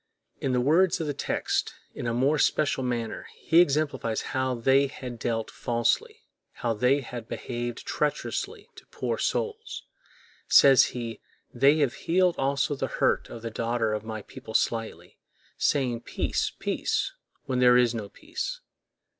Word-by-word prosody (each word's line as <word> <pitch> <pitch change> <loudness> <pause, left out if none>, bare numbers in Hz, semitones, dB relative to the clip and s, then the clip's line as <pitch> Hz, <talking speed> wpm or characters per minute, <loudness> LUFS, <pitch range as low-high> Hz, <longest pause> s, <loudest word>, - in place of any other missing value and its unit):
In 135 - -1
the 125 - +2
words 165 +7 +3
of 160 - -2
the 145 - -2
text, - - -1 0.2
in - - -5
a - - 0
more 140 +5 +2
special 145 -3 +2
manner, 120 -3 -3
he 165 +2 +5
exemplifies 140 -8 0
how 130 -1 0
they 135 +4 +3
had 125 -3 -8
dealt 115 -2 -2
falsely, 270 - -1 0.3
how 120 -1 -1
they 125 +6 +2
had 120 -2 -7
behaved 120 0 -5
treacherously 150 -1 -2
to - - -14
poor - - -3
souls: 445 0 -2 0.6
says 135 -2 +7
he, 115 -2 -5 0.3
"They 140 +5 +5
have 135 -4 +2
healed 180 +1 +2
also 140 +2 +1
the 135 - -2
hurt - - +1
of 115 - -9
the 115 - -4
daughter 115 -1 -1
of 105 -1 -3
my 110 -1 -6
people 110 - -10
slightly, 115 -1 -1 0.4
saying, 125 -5 +1
Peace, - - -1
peace, - - -1 0.3
when 130 -2 -1
there 125 -1 +6
is 120 -1 +3
no 110 -3 -5
peace." - - -5
125 Hz, 155 wpm, -27 LUFS, 115-145 Hz, 0.6 s, says